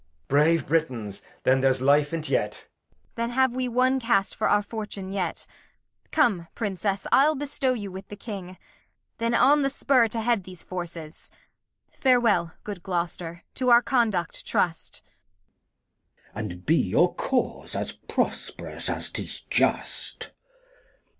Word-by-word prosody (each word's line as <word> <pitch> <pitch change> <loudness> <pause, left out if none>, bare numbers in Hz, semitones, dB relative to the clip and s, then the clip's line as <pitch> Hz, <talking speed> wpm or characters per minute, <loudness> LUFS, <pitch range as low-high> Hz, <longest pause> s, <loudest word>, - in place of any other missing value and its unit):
Brave 150 +2 +3
Britains, 125 -10 -1 0.2
then 130 +1 +4
there's 135 -1 +3
Life 145 +2 +3
in't 160 -2 -3
yet. - - +1
[Aside. - - -15
Kent. - - -39
Then 235 0 -1
have 260 +1 +3
we 255 +1 -1
one 255 +2 +3
Cast 230 -5 +1
for - - +1
our 205 0 +3
Fortune 205 -3 -5
yet. 185 -4 -2 0.7
Come, 210 - +2
Princess, 200 -2 -2
I'll 300 +3 +5
bestow 275 -2 0
you 205 -5 -5
with 190 +1 -8
the 205 - -8
King, 195 -4 -7 0.6
Then 230 +1 +1
on 290 +4 +5
the 275 - +2
Spur 265 -3 +3
to 225 +1 -2
head 230 -3 +1
these 180 -1 -9
Forces. 170 -3 -6 0.6
Farewel, 230 -11 +3
good 200 -4 -6
Gloster, 170 -1 -3
to 255 -1 0
our 240 0 +7
conduct 220 -11 +1
trust. 165 -2 -1
Glost. 90 0 -38
And 95 -4 -6
be 160 - +4
your - - +3
Cause - - -2
as - - -2
prosp'rous - - -3
as - - -3
'tis - - -4
just. - - -1
195 Hz, 145 wpm, -26 LUFS, 165-240 Hz, 0.7 s, our